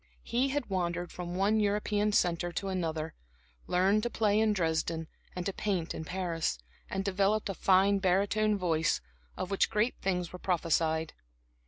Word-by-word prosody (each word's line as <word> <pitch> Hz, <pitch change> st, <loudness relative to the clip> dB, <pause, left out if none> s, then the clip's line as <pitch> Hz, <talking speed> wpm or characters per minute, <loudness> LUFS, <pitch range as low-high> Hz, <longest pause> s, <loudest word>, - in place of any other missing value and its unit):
He 250 Hz, +3 st, +1 dB
had 285 Hz, -1 st, -1 dB
wandered 175 Hz, -2 st, -2 dB
from 175 Hz, 0 st, -5 dB
one 200 Hz, +3 st, +2 dB
European 210 Hz, 0 st, +1 dB
centre 175 Hz, -3 st, +1 dB
to 195 Hz, +2 st, -2 dB
another; 160 Hz, -4 st, -2 dB, 0.5 s
learned 190 Hz, +4 st, +3 dB
to 240 Hz, -, -1 dB
play 215 Hz, -2 st, +2 dB
in 220 Hz, -1 st, +3 dB
Dresden 165 Hz, -3 st, -1 dB, 0.3 s
and 180 Hz, -1 st, -4 dB
to 195 Hz, -, -1 dB
paint 185 Hz, -6 st, -1 dB
in 160 Hz, -, -6 dB
Paris, 170 Hz, -, -2 dB, 0.3 s
and 195 Hz, 0 st, -2 dB
developed 200 Hz, +2 st, +1 dB
a -, -, -1 dB
fine 195 Hz, +2 st, +4 dB
barytone 200 Hz, +3 st, +2 dB
voice, 165 Hz, -4 st, +1 dB, 0.4 s
of 185 Hz, -, -4 dB
which 195 Hz, -, +2 dB
great 215 Hz, +4 st, +1 dB
things 180 Hz, -2 st, -1 dB
were 180 Hz, -, -7 dB
prophesied. 160 Hz, -3 st, 0 dB
190 Hz, 160 wpm, -30 LUFS, 170-205 Hz, 0.5 s, fine